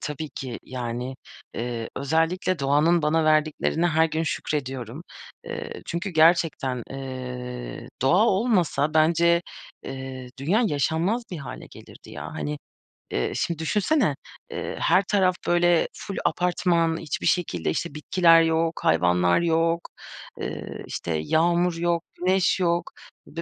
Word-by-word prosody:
tabii 150 +1 -4
ki. 130 -3 -6
Yani, 125 +1 -5 0.4
eee, 115 -1 -3
özellikle 165 +5 0
doğanın 150 +5 +3
bana 155 +1 +2
verdiklerine 155 +2 +2
her 160 -1 +3
gün 160 0 -2
şükrediyorum. 135 -3 -3 0.4
Eee, 470 0 -6
çünkü 170 +3 -3
gerçekten, 155 -6 +3
eee, 125 -2 -6
doğa 180 +12 +4
olmasa 185 - +1
bence, 170 +2 +4 0.4
eee, 130 -1 -7
dünya 185 - +2
yaşanmaz 165 - 0
bir 175 - -5
hâle 140 - -8
gelirdi - - -14
ya. - - -7
Hani, 75 -1 -4 0.5
eee, 60 - -1
şimdi 170 -2 -1
düşünsene, 205 - +1 0.4
eee, - - -4
her 195 - +4
taraf, 185 -2 +2
böyle, 175 -1 +3
ful 200 - -7
apartman, 170 -2 +1
hiçbir 165 -3 -4
şekilde, 90 - 0
işte, 140 - -3
bitkiler 165 +1 +5
yok, 165 0 +1
hayvanlar 90 - +3
yok, 165 0 +2 0.6
eee, - - -6
işte, - - -4
yağmur 170 - +2
yok, 170 0 0
güneş 185 +1 +2
yok 170 -1 +2 0.4
ve 165 +2 -6
160 Hz, 125 wpm, -25 LUFS, 135-175 Hz, 0.6 s, bitkiler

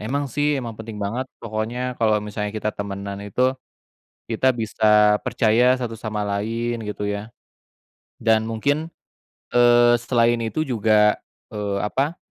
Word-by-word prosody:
Emang 140 +7 -2
sih, 145 0 +1
emang 120 -3 -4
penting 110 0 -9
banget, 115 +6 -3 0.2
pokoknya 115 +3 -3
kalau 110 -2 +3
misalnya 105 0 -3
kita 105 0 -2
temanan 100 0 -5
itu, 125 +6 +1 0.7
kita 120 +3 +2
bisa 105 -3 +3
percaya 125 +3 +3
satu 120 -3 -4
sama 105 -2 -4
lain, 115 +3 -2
gitu 105 -1 -4
ya. 105 +2 -4 0.9
Dan 110 0 +2
mungkin, 145 +8 -1 0.6
eee, 120 0 +5
selain 120 -1 +2
itu 115 +8 -1
juga, 110 -4 +3 0.3
eee, 100 -2 -2
apa, 140 +9 -1
115 Hz, 130 wpm, -22 LUFS, 105-120 Hz, 0.9 s, eee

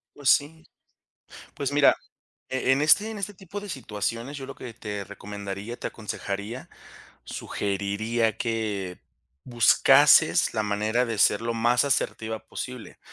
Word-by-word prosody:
Pues 140 -2 0
sí, 160 +2 +2 0.9
pues 140 0 -3
mira, 145 0 +5 0.5
en 130 +1 +1
este 195 +8 +5
en 220 - -6
este 205 +1 -4
tipo 195 +1 -8
de 205 - -9
situaciones, 115 - -4
yo 135 - -6
lo 135 - -9
que 120 -2 -9
te 105 -2 -5
recomendaría, 100 +3 -7
te - - -4
aconsejaría, 105 +2 -5 0.6
sugeriría, 105 +3 -2
que 105 -6 -3 0.4
buscases 120 -1 +5
la 110 - +1
manera 105 +4 0
de 115 -3 -4
ser 105 - +4
lo 115 0 -2
más 120 +2 +3
asertiva 110 -5 -1
posible, 125 -3 -7
115 Hz, 135 wpm, -26 LUFS, 105-135 Hz, 0.9 s, mira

